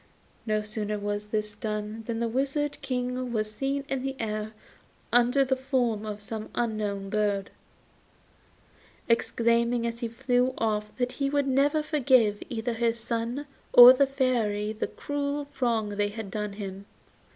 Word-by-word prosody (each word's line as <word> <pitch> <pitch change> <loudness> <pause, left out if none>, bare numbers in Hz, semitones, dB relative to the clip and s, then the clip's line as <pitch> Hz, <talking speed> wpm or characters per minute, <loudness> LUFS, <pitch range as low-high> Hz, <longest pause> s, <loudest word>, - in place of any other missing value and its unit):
No 215 -1 +1
sooner 210 0 -3
was 205 0 -3
this 210 0 -2
done 210 +1 -4
than 230 -1 -2
the 235 - 0
Wizard 275 +4 -1
King 250 -1 -2
was 215 -2 -1
seen 275 +4 -2
in 270 -2 -2
the 270 +1 -3
air 215 -1 -3 0.6
under 245 +3 +4
the 265 0 +1
form 250 -5 -1
of 210 -1 -5
some 215 +1 -6
unknown 210 -4 -2
bird, 205 -2 0 1.6
exclaiming 235 0 +2
as 235 0 -3
he 235 - -2
flew 250 +2 0
off 210 -1 -1
that 250 -1 0
he 275 0 -1
would 285 -1 +1
never 285 +3 +2
forgive 255 -9 +3
either 235 0 -2
his 230 0 0
son 235 +4 -3 0.3
or 245 +1 +12
the 275 +2 +3
Fairy 225 -6 0
the 220 - -3
cruel 285 0 -3
wrong 230 -4 +1
they 205 0 0
had 205 -2 -7
done 210 -1 -3
him. 200 -1 -7
230 Hz, 150 wpm, -27 LUFS, 210-260 Hz, 1.6 s, or